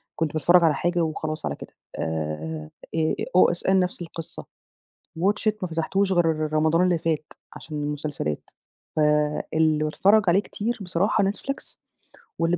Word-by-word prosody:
كنت 160 -2 -1
باتفرج 175 +3 +5
على 160 -2 +5
حاجة 175 +4 0
وخلاص 155 -1 -2
على - - -2
كده. - - -11 0.3
آآ 80 -1 -3 0.7
OSN 185 +2 +4
نفس 180 -1 -1
القصة، 165 -1 -7 0.7
WATCH 205 +5 +1
IT 215 - +4
ما 185 - -1
فتحتوش 190 +4 0
غير 160 -3 +1
رمضان 160 +2 +3
اللي 180 -2 +3
فات 155 -2 -2 0.2
عشان 150 -2 -6
المسلسلات. 145 - -3 0.5
ف - - 0 0.5
اللي 155 -1 +3
باتفرج 200 +7 +4
عليه 180 +3 +5
كتير 225 +4 -3
بصراحة 190 +3 +1
Netflix 210 +8 -4 0.6
واللي 165 +1 +2
165 Hz, 140 wpm, -25 LUFS, 155-185 Hz, 0.7 s, باتفرج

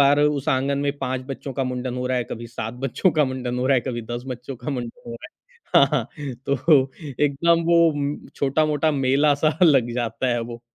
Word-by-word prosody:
बाहर 140 +1 +5
उस 145 -2 +1
आंगन 135 +2 +1
में 140 0 -1
5 130 0 -2
बच्चों 135 0 -6
का 135 +1 -1
मुंडन 125 0 -3
हो 125 0 -2
रहा 130 - 0
है, 120 - -2
कभी 115 0 -7
7 115 0 -6
बच्चों 135 +8 +2
का 150 -1 +3
मुंडन 130 -1 -3
हो 125 - 0
रहा 135 - +4
है, 125 - +3
कभी 120 -1 -4
10 120 0 -4
बच्चों 125 0 -6
का 150 - -5
मुंडन 120 -4 -5
हो - - -5
रहा 115 - -9
है। - - -20 0.4
हाँ, 140 - +7
हाँ, 125 -6 +1 0.4
तो 140 0 +3 0.3
एकदम 165 +4 +2
वो 170 0 +4
उम, 145 -1 -2 0.2
छोटा-मोटा 150 +2 +1
मेला-सा 145 +3 +2
लग 135 -8 +5
जाता 120 +1 -2
है 120 - 0
वो। 115 0 -7
135 Hz, 220 wpm, -23 LUFS, 125-145 Hz, 0.4 s, हाँ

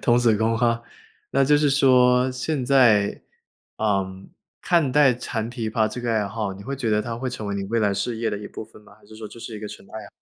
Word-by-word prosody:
童 120 0 +4
子 115 -3 +3
功 115 +1 +1
哈。 115 0 +1 0.5
那 135 - +3
就 145 +2 +4
是 145 -1 +2
说 130 -2 +4
现 130 +2 -3
在， 120 -6 +3 0.6
呃， 100 -3 +1 0.5
看 160 -7 +1
待 145 -3 +5
弹 115 -1 -4
琵 115 -3 -4
琶 110 0 +1
这 110 +3 -6
个 120 -1 -1
爱 105 -2 0
好， 105 -1 -3
你 95 +1 -11
会 140 +4 -5
觉 120 -4 -2
得 105 0 +2
它 115 +1 -5
会 130 +2 -3
成 110 -4 -6
为 100 - -3
你 100 - -3
未 115 +3 -1
来 105 -1 +2
事 115 +4 -2
业 115 0 -1
的 105 - -3
一 105 - -8
部 - - -8
分 110 - -18
吗？ 100 -1 -18
还 105 - -23
是 110 - -14
说 110 - -8
这 115 - -12
是 115 -1 -7
一 - - -7
个 105 - -6
纯 - - -12
爱 110 -1 -8
啊？ - - -12
115 Hz, 280 characters per minute, -23 LUFS, 105-125 Hz, 0.6 s, 待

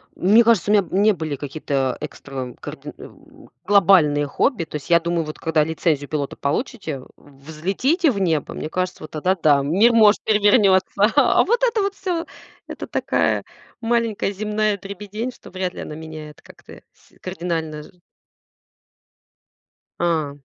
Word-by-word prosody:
Мне 215 +6 +5
кажется, 220 -4 +3
у - - +4
меня, 205 -2 +5
м, 190 +2 -1
не 215 +1 +5
были 155 -4 -4
какие-то 135 -2 -2
экстра 135 -4 -7
карди - - -8
м, - - -15 0.2
глобальные 170 -8 +4
хобби. 200 - 0
То - - -10
есть, 150 - -6
я 170 0 +6
думаю, 170 0 -1
вот 155 - -8
когда 160 -2 +1
лицензию 155 -2 -1
пилота 145 -3 -3
получите, 155 - -3 0.2
взлетите 185 - -1
в 200 - -3
небо. 165 -6 0
Мне 155 - -5
кажется, 185 +1 -3
вот 155 - -10
тогда 180 +5 0
да, 145 -2 +4
мир 195 +11 +4
может 215 -2 +5
перевернется. 205 -1 +3
А 285 -4 +4
вот 475 +4 0
это 465 -4 +2
вот 395 0 -1
всё- 355 -3 -3 0.4
это - - -7
такая - - 0 0.4
маленькая 230 -3 0
земная 210 0 -1
дребедень, 205 +5 -6
что - - -15
вряд 185 -1 -3
ли - - -8
она 150 - -7
меняет 155 -1 -10
как-то - - -15
с - - -27
кардинально 165 -4 -4
ж - - -14 2.1
А. 155 -5 -1
180 Hz, 155 wpm, -21 LUFS, 155-215 Hz, 2.1 s, я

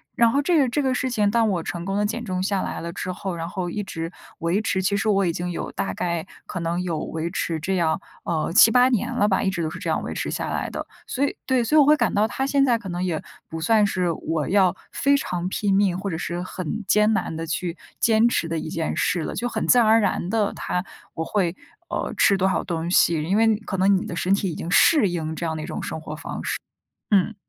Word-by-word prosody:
然 235 -1 +4
后 280 - +2
这 335 +5 +2
个 275 -5 +4
这 290 +4 0
个 260 -1 +1
事 260 +1 -1
情， 210 -4 +1
当 230 -1 +3
我 175 -4 -1
成 170 +1 -4
功 195 +2 -2
地 210 - +1
减 225 +3 -3
重 185 -4 -2
下 195 -1 0
来 - - -4
了 170 0 -6
之 185 - -4
后， 185 0 -4
然 165 0 -4
后 175 -1 -3
一 210 - -2
直 165 -4 -5 0.3
维 170 +5 0
持， 190 -3 -1
其 200 +2 +1
实 205 +2 0
我 200 -2 +3
已 170 - 0
经 175 +2 -3
有 175 - -4
大 95 -1 -3
概 170 -2 -1 0.2
可 180 - -5
能 170 +1 -1
有 170 -4 -2
维 160 +1 -4
持 165 -3 -2
这 190 +5 -1
样， 165 -2 +1 0.2
呃， 165 -1 -1
7-8 240 +6 +7
年 235 -6 0
了 205 - +2
吧， 190 -2 +2
一 195 - +1
直 175 -3 -2
都 155 - -2
是 - - -7
这 - - -4
样 - - 0
维 - - -4
持 - - -3
下 - - -3
来 - - -2
的。 - - -5 0.2
所 275 +2 0
以 - - -3
对， 260 -2 +2
所 230 +7 0
以 305 - +8
我 280 - +4
会 300 +1 +6
感 - - +1
到， 210 +1 +3
它 265 +5 -2
现 275 0 +3
在 245 -4 +3
可 220 - -10
能 175 +1 -3
也 170 -4 -1 0.3
不 160 - -5
算 215 +6 +3
是 180 -3 0
我 160 -2 -2
要 190 0 +3 0.2
非 280 +1 +3
常 180 -8 -3
拼 195 0 0
命 195 -3 +2
或 195 +1 -3
者 160 - -3
是 175 +1 -3
很 185 +4 -5
艰 210 +1 +4
难 165 - -1
地 165 +1 -4
去 170 +1 -2 0.2
坚 225 +1 +4
持 170 - 0
的 165 0 -2
一 155 - -5
件 165 -1 -2
事 175 -3 0
了， - - -4
就 245 - -2
很 - - -2
自 250 - +6
然 230 - +4
而 220 +1 +6
然 190 -4 0
地 210 -1 +1
它 180 - -2 0.3
我 160 - -2
会， 185 -3 0 0.3
呃， - - -2
吃 200 - +5
多 190 0 +2
少 - - 0
东 170 -1 -3
西， 165 -3 +4
因 185 +6 +1
为 225 -1 +4
可 195 - -3
能 195 +2 +4
你 - - -4
的 - - -5
身 180 +2 +1
体 195 -1 +1
已 - - -6
经 170 - -5
适 270 - +5
应 160 -2 -3
这 170 - -4
样 160 -1 -2
的 - - -4
一 - - -4
种 - - -4
生 - - -4
活 155 -1 -7
方 150 - -6
式， - - -2 0.5
嗯。 205 +2 +3
190 Hz, 290 characters per minute, -23 LUFS, 170-220 Hz, 0.5 s, 以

